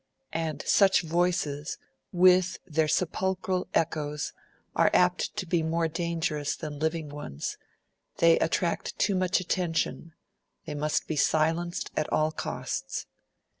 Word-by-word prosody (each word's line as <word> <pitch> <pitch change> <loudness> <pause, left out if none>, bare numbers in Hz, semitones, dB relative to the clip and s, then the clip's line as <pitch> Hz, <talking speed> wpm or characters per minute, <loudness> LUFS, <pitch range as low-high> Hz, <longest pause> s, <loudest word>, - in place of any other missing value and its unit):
And 160 -3 -2
such 195 -2 +5
voices, 165 -3 0 0.3
with 180 0 +5
their 160 -3 +1
sepulchral 185 +3 0
echoes, 150 -2 -1 0.4
are - - +5
apt 180 0 +2
to - - -2
be 170 -1 +1
more 165 +1 +1
dangerous 165 -2 -1
than 150 -3 -6
living 160 0 -1
ones; 145 - -6 0.6
they 165 -1 +5
attract 170 +1 -1
too 205 - +2
much 185 -1 +2
attention; 170 -2 -1 0.5
they - - -5
must 150 +1 0
be 160 - -3
silenced 165 +4 +1
at 155 - -1
all 155 0 +2
costs. - - -4
165 Hz, 125 wpm, -28 LUFS, 155-180 Hz, 0.6 s, such